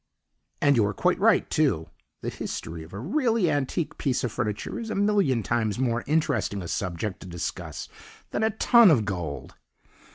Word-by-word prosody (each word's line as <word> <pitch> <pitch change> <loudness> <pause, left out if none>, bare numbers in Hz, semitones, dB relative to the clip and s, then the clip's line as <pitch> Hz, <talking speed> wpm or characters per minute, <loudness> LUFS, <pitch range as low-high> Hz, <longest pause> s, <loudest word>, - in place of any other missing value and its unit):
And 140 -2 +4
you 110 - +5
are 100 - -3
quite - - +1
right, - - +4
too; 105 - 0 0.3
the - - -3
history 80 0 -5
of 80 +2 -12
a 100 - -7
really 220 - +1
antique 145 +3 -2
piece 130 -3 0
of 125 - -1
furniture 105 - -3
is 225 -1 -5
a - - -2
million 200 - +2
times 110 -3 0
more 120 -2 0
interesting 110 - 0
a - - -6
subject 90 +3 -3
to - - -10
discuss 85 -2 -5 0.4
than - - -1
a 220 - +3
ton 225 0 +6
of 125 -10 +4
gold. 85 -7 -4
120 Hz, 175 wpm, -26 LUFS, -, 0.4 s, ton